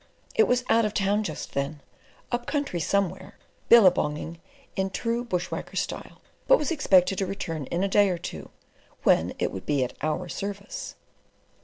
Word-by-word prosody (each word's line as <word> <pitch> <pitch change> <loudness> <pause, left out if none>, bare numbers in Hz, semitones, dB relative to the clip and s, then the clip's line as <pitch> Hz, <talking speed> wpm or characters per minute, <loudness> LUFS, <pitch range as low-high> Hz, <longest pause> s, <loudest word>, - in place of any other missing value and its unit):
It 445 - +4
was 250 0 +2
out 230 - +4
of 210 -1 -1
town 205 +2 +2
just 155 -7 -5
then, 140 +2 -2 0.5
up 240 0 -2
country 285 - -1
somewhere, 195 +3 -1 0.3
billabonging 170 -7 +4 0.4
in 190 0 0
true 230 +4 -1
bush 180 -6 -2
whacker 165 - -5
style, - - -4 0.3
but - - +7
was 300 - -2
expected 195 - +3
to 195 - 0
return 165 -6 -4
in 175 +2 -1
a - - +2
day 200 0 +4
or 180 - -1
two, - - -7 0.5
when - - +3
it - - -1
would 95 - -8
be 145 -3 +2
at 125 - -4
our 155 +4 -1
service. 200 +3 -5
195 Hz, 170 wpm, -26 LUFS, 165-225 Hz, 0.5 s, but